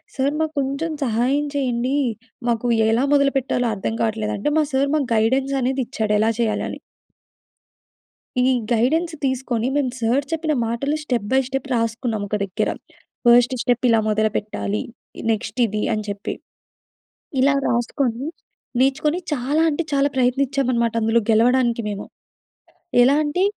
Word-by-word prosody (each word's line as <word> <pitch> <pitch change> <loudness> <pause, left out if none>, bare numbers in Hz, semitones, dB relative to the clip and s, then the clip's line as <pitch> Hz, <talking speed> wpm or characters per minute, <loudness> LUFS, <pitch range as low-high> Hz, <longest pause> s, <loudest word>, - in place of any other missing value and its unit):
"Sir 275 +1 +1
మాకు 315 0 -1
కొంచెం 280 +4 -2
సహాయం 255 +5 +1
చేయండి. 255 -1 0 0.5
మాకు 235 +1 0 0.2
ఎలా 230 +4 +2
మొదలుపెట్టాలో 270 -3 +2
అర్థం 205 +3 -3
కావట్లేదు," 215 -1 -1
అంటే 295 +9 -1
మా 310 - +4
సార్ 275 +1 +2
మాకు 280 -4 0
గైడెన్స్ 265 +5 +2
అనేది 260 +2 0
ఇచ్చాడు, 215 -1 -1
ఎలా 220 +1 +3
చేయాలి 225 -2 0
అని. - - -7 1.6
ఈ - - +4 0.3
గైడెన్స్ 315 +9 +2
తీసుకొని 255 -3 -1
మేము 275 -3 +1
సర్ 245 +5 +1
చెప్పిన 315 -1 0
మాటలు 275 +6 -1
స్టెప్ 245 -8 -2
బై 265 - +5
స్టెప్ 270 0 -3
రాసుకున్నాం 230 -1 -1
ఒక 210 - -2
దగ్గర. 195 -1 -1 0.6
ఫస్ట్ 245 +1 +6
స్టెప్ 245 0 +1
ఇలా 225 -1 +4
మొదలుపెట్టాలి, 215 -1 -1 0.5
నెక్స్ట్ 220 +2 -3
ఇది 210 0 -2
అని 215 0 -2
చెప్పి. 200 0 -4 1.1
ఇలా 280 +1 +4
రాసుకొని, 240 +2 -1 0.5
నేర్చుకొని, 295 +5 +2
చాలా 290 +4 +1
అంటే 305 +3 -1
చాలా 280 0 +3
ప్రయత్నించామనమాట 255 -2 +1
అందులో 225 +1 +3
గెలవడానికి 235 +1 +3
మేము. 205 -1 -5 1.0
ఎలా 275 +3 +5
అంటే 355 +6 0
250 Hz, 135 wpm, -21 LUFS, 225-275 Hz, 1.6 s, ఫస్ట్